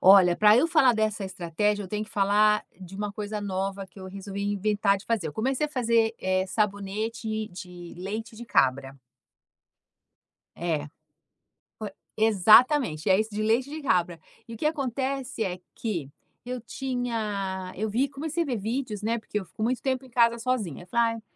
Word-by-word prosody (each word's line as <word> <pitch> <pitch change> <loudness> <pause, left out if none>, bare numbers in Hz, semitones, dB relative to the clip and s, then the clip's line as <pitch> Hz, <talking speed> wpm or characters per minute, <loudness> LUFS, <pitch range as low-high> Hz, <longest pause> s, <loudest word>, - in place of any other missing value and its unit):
Olha, 185 -2 +7
para 210 0 +6
eu 260 - +4
falar 310 -7 +5
dessa 215 -2 0
estratégia, 190 +3 -1
eu 190 - -8
tenho 210 +2 -2
que 215 - -18
falar 210 0 +3 0.2
de 185 0 -10
uma 205 0 -3
coisa 210 0 -4
nova 195 0 -3
que 195 - -17
eu 190 - -7
resolvi 195 +1 -6
inventar 205 0 +2
de 195 - -11
fazer. 225 -7 0
Eu - - -7
comecei 265 - 0
a - - -11
fazer, 230 -5 +2
eh, 185 0 +1
sabonete 215 +2 -2
de 175 -1 -10
leite 215 +5 -5
de 240 - -8
cabra. 135 - +1 1.6
É. 160 -4 -2 0.9
Foi 215 -2 -5 0.3
exatamente. 215 - +5
É 190 +1 +5
isso, 215 0 0
de 210 - -2
leite 230 +5 +2
de 310 +2 -6
cabra. 180 - +1 0.3
E 230 - -8
o - - -7
que 300 - -4
acontece 270 -3 -1
é 180 -3 -3 0.2
que 175 - -3 0.4
eu 250 0 -4
tinha 215 -7 -3
eu 215 +2 -2
vi 255 +7 +1
comecei 310 +4 -2
a - - -7
ver 255 -5 -1
vídeos, 220 0 -3
né, 230 +2 0
porque 210 -1 -3
eu 190 - -8
fico 215 - -11
muito 245 +2 0
tempo 260 -1 -1
em - - -15
casa 235 -1 +3
sozinha. 225 - -2
Eu - - -17
falei: 230 +3 +2
"Ai", 225 - -9
215 Hz, 185 wpm, -27 LUFS, 190-235 Hz, 1.6 s, Olha